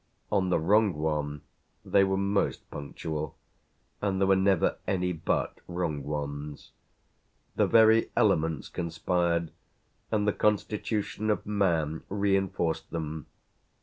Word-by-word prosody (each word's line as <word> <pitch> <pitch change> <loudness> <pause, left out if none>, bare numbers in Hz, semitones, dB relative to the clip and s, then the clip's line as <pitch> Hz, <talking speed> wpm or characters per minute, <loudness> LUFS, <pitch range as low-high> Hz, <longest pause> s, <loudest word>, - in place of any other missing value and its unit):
On 95 -2 +2
the 90 - +3
wrong 100 +4 +3
one 75 -2 -2 0.4
they 100 - +4
were 95 0 +1
most 100 +1 0
punctual, 75 +1 -5 0.6
and 95 -2 0
there 95 - +3
were 95 0 +5
never 95 -2 +2
any 90 -1 0
but 80 0 -1
wrong 85 -5 -2
ones. 75 0 -5 0.8
The - - +3
very 110 0 +5
elements 80 -2 +2
conspired 85 0 -1 0.6
and 105 -1 +1
the 105 - +3
constitution 105 0 -1
of 105 - 0
man 85 -7 0
reinforced 95 -4 0
them. 80 -2 -5
90 Hz, 115 wpm, -28 LUFS, 80-100 Hz, 0.8 s, were